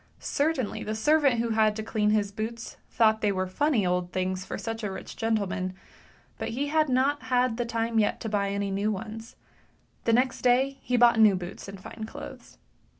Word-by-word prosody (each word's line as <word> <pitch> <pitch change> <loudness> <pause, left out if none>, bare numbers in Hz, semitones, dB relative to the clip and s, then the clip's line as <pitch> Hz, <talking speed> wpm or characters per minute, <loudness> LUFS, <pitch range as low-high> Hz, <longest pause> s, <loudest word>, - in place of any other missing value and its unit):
Certainly 285 -6 -1
the 215 - -3
servant 280 0 +3
who 230 0 0
had 220 -1 +3
to 220 - -4
clean 215 -1 0
his 210 -1 +1
boots 225 +2 -5
thought 220 -1 +3
they 210 - +2
were 185 -1 -1
funny 230 +3 +1
old 180 0 0
things 185 0 -2
for - - -5
such 225 0 -5
a 205 - -1
rich 190 - -8
gentleman, 200 -5 -1 0.6
but - - -3
he 280 +5 -2
had 310 -1 +2
not 270 +3 +2
had 250 -2 +1
time 230 0 0
yet 210 - +1
to - - -4
buy 205 -2 0
any 200 0 -2
new 200 +2 0
ones; 220 +2 -7 0.7
the 230 - +3
next 250 +1 +2
day 260 +2 +2
he 250 - 0
bought 235 -1 +5
new 215 -3 +7
boots 180 +1 -7
and 195 -1 -8
fine 220 +3 -8
clothes. - - -10
220 Hz, 195 wpm, -27 LUFS, 200-245 Hz, 0.7 s, new